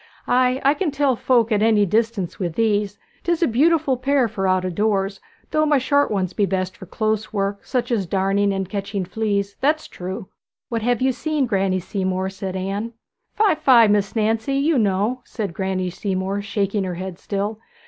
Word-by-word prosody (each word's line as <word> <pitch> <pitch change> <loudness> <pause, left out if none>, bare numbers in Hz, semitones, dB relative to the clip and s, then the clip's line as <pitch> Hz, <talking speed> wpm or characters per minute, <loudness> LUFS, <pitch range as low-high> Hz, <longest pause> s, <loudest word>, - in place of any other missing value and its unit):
Ay, 255 +1 +2
I 280 - +6
can 350 +1 -1
tell 280 -2 +1
folk 235 -1 +2
at 210 -1 +2
any 215 -2 +4
distance 215 -2 -1
with 175 -4 -2
these 205 -3 +1 0.3
'tis 345 0 +1
a - - +4
beautiful 285 +2 +2
pair 270 0 +2
for 195 -3 -2
out 185 0 +2
o' 185 - -2
doors; 195 0 0 0.3
though 310 - +2
my 300 -1 +3
short 285 +2 +2
ones 190 -3 -1
be 200 +1 +1
best 185 -1 -2
for 190 - -11
close 215 +1 -1
work, 200 -1 -2
such 245 -1 -2
as 205 -6 0
darning, 195 +2 +1
and 195 -1 -2
catching 200 0 -3
fleas, 200 0 -2
that's 305 +3 +1
true.' 185 +1 -6 0.4
'What 230 -1 -2
have 245 +2 +1
you 265 - +3
seen, 300 +2 -1
Granny 195 -4 +1
Seamore?' 190 0 -2
said 190 -1 -5
Anne. 200 +5 -3 0.4
'Fie, 425 -2 +4
fie, 250 -7 +5
Miss 205 0 +1
Nancy! 225 +4 0
you 285 +1 +2
know,' 210 +4 +1
said 205 -9 -5
Granny 185 -1 -2
Seamore, 190 +1 -2
shaking 200 0 -1
her 180 -2 -3
head 185 0 -6
still. 205 +2 -3
210 Hz, 190 wpm, -22 LUFS, 195-245 Hz, 0.4 s, I